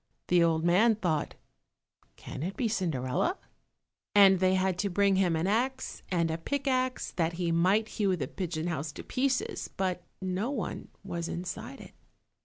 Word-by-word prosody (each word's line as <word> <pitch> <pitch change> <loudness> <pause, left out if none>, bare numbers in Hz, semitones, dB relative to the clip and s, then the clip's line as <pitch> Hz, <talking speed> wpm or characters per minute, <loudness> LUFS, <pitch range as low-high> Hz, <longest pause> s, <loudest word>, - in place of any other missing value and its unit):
The 175 -1 +5
old 165 -1 +2
man 210 +7 +5
thought, 170 -8 -1 0.8
"Can - - -8
it 185 +5 -4
be 245 - +1
Cinderella?" 175 - 0 0.8
and 195 -2 +7
they 185 0 +3
had 185 -1 +1
to 200 - 0
bring 195 +1 +3
him 180 -3 +2
an 160 +2 0
axe 255 +6 -1
and 170 -3 +1
a 160 - -3
pickaxe 255 +3 -1
that 170 -1 0
he 170 0 -1
might 185 +6 +3
hew 200 -4 0
the - - -3
pigeon 170 -4 -4
house 155 -3 -2
to - - -8
pieces, 260 0 -1
but 185 -2 -1 0.2
no 190 +5 -2
one 250 -9 -4 0.2
was 170 -3 -4
inside 175 +2 -5
it. - - -12
185 Hz, 165 wpm, -29 LUFS, 170-215 Hz, 0.8 s, and